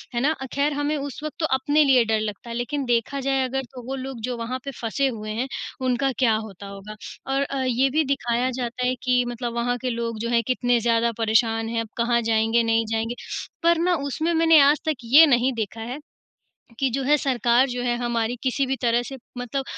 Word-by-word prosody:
है 235 Hz, -, +1 dB
ना। 295 Hz, -, +3 dB
अ, 265 Hz, -, -3 dB
ख़ैर 285 Hz, +1 st, +1 dB
हमें 290 Hz, +1 st, -1 dB
उस 280 Hz, -2 st, -5 dB
वक़्त 305 Hz, -, -5 dB
तो 315 Hz, -, +1 dB
अपने 290 Hz, +3 st, +3 dB
लिए 260 Hz, -3 st, +5 dB
डर 220 Hz, -1 st, +1 dB
लगता 215 Hz, +2 st, -5 dB
है, 230 Hz, -, -5 dB
लेकिन 260 Hz, +4 st, -2 dB
देखा 240 Hz, +3 st, 0 dB
जाए 270 Hz, 0 st, +1 dB
अगर, 270 Hz, +1 st, -2 dB
तो 255 Hz, -, -9 dB
वो 270 Hz, -, -3 dB
लोग 265 Hz, -2 st, -6 dB
जो 250 Hz, -, -2 dB
वहाँ 245 Hz, +3 st, -4 dB
पर 275 Hz, -, -4 dB
फँसे 255 Hz, +4 st, 0 dB
हुए 215 Hz, -4 st, -5 dB
हैं, 240 Hz, +5 st, -2 dB, 0.4 s
उनका 255 Hz, +2 st, +1 dB
क्या 230 Hz, -4 st, +4 dB
होता 205 Hz, -3 st, -7 dB
होगा? 200 Hz, +2 st, -9 dB, 0.4 s
और 275 Hz, -, +1 dB
अ, 275 Hz, -1 st, -3 dB
ये 255 Hz, +2 st, +2 dB
भी 310 Hz, +4 st, +2 dB
दिखाया 250 Hz, -2 st, 0 dB
जाता 245 Hz, +1 st, -2 dB
है 255 Hz, 0 st, +1 dB
कि 250 Hz, -1 st, +3 dB
मतलब 240 Hz, 0 st, -4 dB
वहाँ 245 Hz, +1 st, 0 dB
के 255 Hz, -, -1 dB
लोग 230 Hz, -2 st, -3 dB
जो 235 Hz, -, -2 dB
हैं 235 Hz, -1 st, +3 dB
कितने 245 Hz, -1 st, +2 dB
ज़्यादा 230 Hz, 0 st, +2 dB
परेशान 225 Hz, 0 st, +1 dB
हैं, 230 Hz, 0 st, -1 dB
अब 225 Hz, -, -6 dB
कहाँ 235 Hz, 0 st, +2 dB
जाएँगे, 225 Hz, +1 st, +2 dB
नहीं 225 Hz, 0 st, +2 dB
जाएँगे। 225 Hz, +1 st, -1 dB, 0.5 s
पर 340 Hz, 0 st, +4 dB
ना 355 Hz, +1 st, +2 dB
उसमें 320 Hz, +5 st, -1 dB
मैंने 325 Hz, -1 st, +6 dB
आज 285 Hz, +1 st, +5 dB
तक 310 Hz, -2 st, +1 dB
ये 275 Hz, +8 st, +8 dB
नहीं 255 Hz, -2 st, +3 dB
देखा 225 Hz, -1 st, -4 dB
है 245 Hz, +6 st, -5 dB, 0.8 s
कि 270 Hz, -, +2 dB
जो 270 Hz, +3 st, -2 dB
है 290 Hz, +3 st, +4 dB
सरकार 255 Hz, -2 st, +2 dB
जो 245 Hz, 0 st, -3 dB
है 240 Hz, -1 st, +1 dB
हमारी, 240 Hz, -1 st, -1 dB
किसी 265 Hz, +1 st, +1 dB
भी 265 Hz, +1 st, -1 dB
तरह 235 Hz, 0 st, +2 dB
से 270 Hz, -, -7 dB, 0.2 s
मतलब 245 Hz, +3 st, -3 dB
245 Hz, 230 wpm, -24 LUFS, 230-270 Hz, 0.8 s, ये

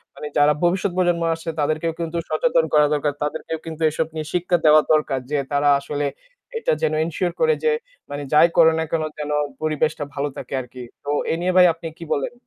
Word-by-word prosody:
মানে 150 Hz, -, -6 dB
যারা 150 Hz, +1 st, +5 dB
ভবিষ্যৎ 185 Hz, +2 st, +1 dB
প্রজন্ম 175 Hz, -2 st, +2 dB
আসছে 165 Hz, +1 st, -6 dB
তাদেরকেও 155 Hz, +3 st, 0 dB
কিন্তু 170 Hz, 0 st, -3 dB
সচেতন -, -, +2 dB
করা 150 Hz, 0 st, +6 dB
দরকার। 145 Hz, 0 st, 0 dB
তাদেরকেও 160 Hz, +1 st, -4 dB
কিন্তু 160 Hz, 0 st, -7 dB
এসব 155 Hz, +1 st, -2 dB
নিয়ে 155 Hz, -1 st, -4 dB
শিক্ষা 180 Hz, 0 st, +1 dB
দেওয়া 155 Hz, 0 st, +7 dB
দরকার 150 Hz, -3 st, +1 dB
যে 150 Hz, -, +1 dB
তারা 145 Hz, 0 st, +2 dB
আসলে 145 Hz, +1 st, -3 dB, 0.5 s
এটা -, -, +1 dB
যেন 155 Hz, -, +1 dB
ensure 170 Hz, +2 st, -2 dB
করে 475 Hz, 0 st, +4 dB
যে 465 Hz, -, +3 dB, 0.4 s
মানে 145 Hz, 0 st, -4 dB
যাই 150 Hz, +3 st, +7 dB
করে 160 Hz, -1 st, +7 dB
না -, -, +1 dB
কেন 160 Hz, -1 st, 0 dB, 0.2 s
যেন 150 Hz, 0 st, -3 dB, 0.3 s
পরিবেশটা 155 Hz, -1 st, 0 dB
ভালো 145 Hz, 0 st, -2 dB
থাকে -, -, -8 dB
আরকি। 125 Hz, 0 st, -10 dB, 0.2 s
তো 145 Hz, -, -6 dB, 0.2 s
এ -, -, +2 dB
নিয়ে 180 Hz, +1 st, 0 dB
ভাই 180 Hz, -, +8 dB
আপনি 165 Hz, 0 st, -8 dB
কি 170 Hz, -, -9 dB
বলেন? 140 Hz, -, -2 dB
155 Hz, 200 wpm, -22 LUFS, 150-170 Hz, 0.5 s, ভাই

